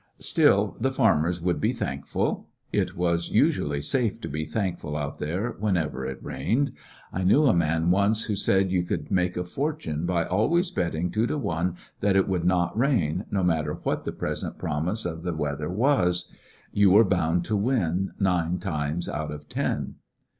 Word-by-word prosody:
Still, - - +3
the 130 +3 +1
farmers 90 - +2
would 90 0 0
be - - +2
thankful. - - -2 0.3
It - - 0
was 85 -1 0
usually 75 -1 +2
safe 115 - 0
to - - -4
be 75 +2 -3
thankful 90 -7 -3
out 75 0 -4
there 90 +11 -2
whenever 80 -10 -1
it 65 - -5
rained. 140 +4 0 0.4
I 95 - -1
knew 105 +12 +5
a 130 - +5
man 80 0 +2
once 100 +4 +2
who 105 - -2
said 95 -1 +2
you 90 -1 +2
could 85 - -4
make 90 -2 +1
a 90 - 0
fortune 90 - -3
by 85 -2 +1
always 165 - +1
bet 85 -1 -1
ting 85 +3 -1
two 110 +2 +1
to 150 - -1
one 90 - -1 0.2
that 100 -1 +2
it 95 - +3
would 90 -3 -1
not 90 -1 +2
rain, 110 - +1
no 100 -2 0
matter 80 -4 +1
what - - -2
the - - -3
present - - -4
promise 85 +9 -2
of 80 -2 -4
the 90 -1 -3
weather 75 0 -2
was. 90 -5 +1 0.4
You 100 -1 +5
were 105 +4 +7
bound 85 -2 +1
to 110 - 0
win 95 -5 0
nine 90 -2 +1
times 80 -2 -2
out 75 0 -3
of 75 0 -8
ten. - - -2
90 Hz, 180 wpm, -26 LUFS, 80-105 Hz, 0.4 s, were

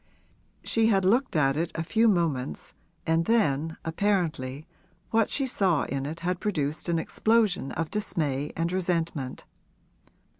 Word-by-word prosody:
She 225 -1 +2
had 195 -4 +3
looked 240 +3 +2
at 135 -3 +3
it 165 +2 -1
a 160 - -1
few 225 +7 +3
moments 165 - 0 0.3
and 165 +1 +2
then 160 -8 +1
apparently 160 -6 -1 0.5
what 225 -1 +3
she 275 - 0
saw 190 - +2
in 135 0 -3
it 160 +3 -6
had 180 +1 -1
produced 155 -5 -2
an 170 - +2
explosion 215 -3 +1
of 165 -1 -3
dismay 150 -9 -1
and 165 +1 0
resentment. 170 -7 -2
165 Hz, 140 wpm, -27 LUFS, 150-200 Hz, 0.5 s, had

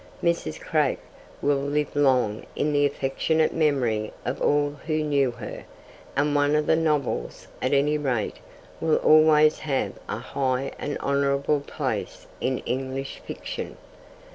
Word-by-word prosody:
Mrs. 170 - 0
Craik - - +1 0.5
will 145 -1 +3
live 145 +1 -1
long 130 -7 +2
in 150 0 0
the 145 0 +4
affectionate 145 +3 0
memory 125 -9 +1
of 130 - -3
all 145 0 +2 0.2
who 155 -1 +1
knew 140 -3 +2
her, 120 -3 -7 0.5
and 145 +1 +2
one 145 +1 +3
of 150 0 +2
her 160 - +4
novels, 150 - -1
at 130 - 0
any 145 +2 +3
rate, 125 -7 -1 0.4
will 160 -1 +2
always 155 0 +5
have 140 -4 -1 0.2
a - - -2
high 135 -1 -1
and 145 - -3
honourable 140 +1 +1
place 140 - -4
in 130 -1 0
English 135 +1 -3
fiction. - - -6
140 Hz, 140 wpm, -25 LUFS, 130-150 Hz, 0.5 s, always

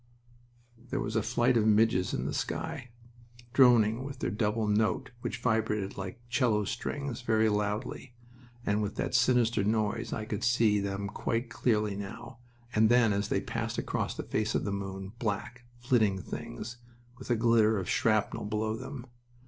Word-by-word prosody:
There 135 - -1
was 105 -3 -3
a 110 - +3
flight 120 +3 +2
of 110 -1 +3
midges 105 -3 +3
in - - -2
the - - -2
sky, 160 -6 -3 0.6
droning 120 -3 +5
with 140 0 -6
that - - -2
double 110 0 0
note 110 +5 +1
which - - -3
vibrated 105 -3 0
like 95 +2 -6
'cello 115 -4 +2
strings, 125 +3 -4
very 110 -2 +2
loudly, 105 +4 -2 0.5
and 105 +1 +1
with 105 -1 -3
that - - -2
sinister 120 -4 +3
noise 105 0 0
I 110 - -3
could 105 -2 -4
see 115 -3 +3
them 100 0 -3
quite 115 +3 -2
clearly 105 -4 +1
now 115 +4 -8 0.3
and 110 0 +4
then 120 -3 +5
as 100 +1 -1
they - - 0
passed - - -3
across - - -2
the - - -3
face 110 0 -1
of - - +1
the 100 - -2
moon, 95 -1 -5
black, 120 +3 -3
flitting 120 -6 +2
things, 105 - -7 0.4
with - - -10
a 120 - +3
glitter 110 -1 +4
of 95 -2 -3
shrapnel 110 -1 +1
below 110 +1 -1
them. 125 +2 -7
110 Hz, 165 wpm, -30 LUFS, 105-120 Hz, 0.6 s, droning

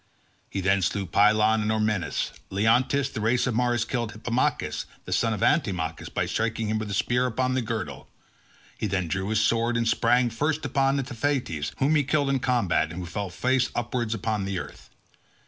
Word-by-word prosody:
He 95 - -3
then 95 +1 +2
slew 95 +3 0
Pylon 105 +4 +4
and 105 +1 0
Ormenus. 105 -7 0 0.2
Leonteus, 125 +7 +2
of - - -18
the 110 - -3
race 120 +3 +2
of 125 - 0
Mars, 120 0 +1
killed 115 -2 -2
Hippomachus 120 +3 -1 0.2
the - - -8
son 115 - +2
of 105 - -2
Antimachus 90 - 0
by - - -1
striking 110 -1 -1
him 110 0 0
with 110 - -4
his 100 -1 -2
spear 125 +3 +1
upon 130 +1 0
the 130 - +1
girdle. 110 - -4 0.7
He - - -1
then 95 -3 -1
drew 95 +4 -2
his 110 0 +2
sword 115 +2 +2
and 115 0 0
sprang 120 +1 +3
first 150 +6 -1
upon 135 0 +2
Antiphates 125 - -2
whom 140 +3 +2
he 150 -2 +3
killed 140 0 +1
in 135 - +1
combat, 115 -12 +1
and 85 - -8
who - - -5
fell 95 +3 -4
face 125 +7 +1
upwards 120 -1 -1
on 105 -1 -2
the 100 -1 -2
earth. - - -8
115 Hz, 195 wpm, -26 LUFS, 100-125 Hz, 0.7 s, Pylon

